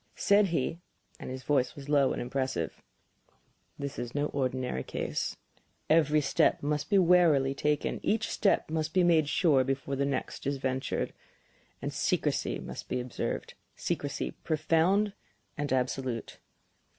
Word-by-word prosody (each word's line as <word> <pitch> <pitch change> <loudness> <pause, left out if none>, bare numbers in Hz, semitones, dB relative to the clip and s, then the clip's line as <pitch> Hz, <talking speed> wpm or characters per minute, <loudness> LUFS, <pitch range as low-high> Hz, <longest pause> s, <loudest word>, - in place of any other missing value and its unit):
Said 205 -1 +4
he 165 -1 -1 0.4
and - - -7
his 130 0 -6
voice 135 -4 +1
was 140 -1 -10
low 145 -2 +3
and - - -2
impressive: 130 -8 -2 1.0
"This 140 -1 -5
is 120 +1 -5
no 145 0 +1
ordinary 130 - -1
case. - - -3 0.5
Every 155 -1 +4
step 140 - +2
must 150 0 -1
be 200 - +4
warily 165 -7 +5
taken; 150 +1 0
each 220 +1 +1
step 195 -5 +1
must 160 +1 -2
be 185 - +5
made 160 -4 +4
sure 150 -7 +4
before 135 +1 -2
the 140 +1 0
next 140 -1 -3
is 140 0 0
ventured. 130 0 -2 0.7
And - - -3
secrecy - - 0
must - - -8
be - - -1
observed 125 0 -4 0.2
secrecy - - -2
profound 165 +6 +1 0.4
and 145 -2 -3
absolute. 130 -2 -2
145 Hz, 140 wpm, -30 LUFS, 130-160 Hz, 1.0 s, warily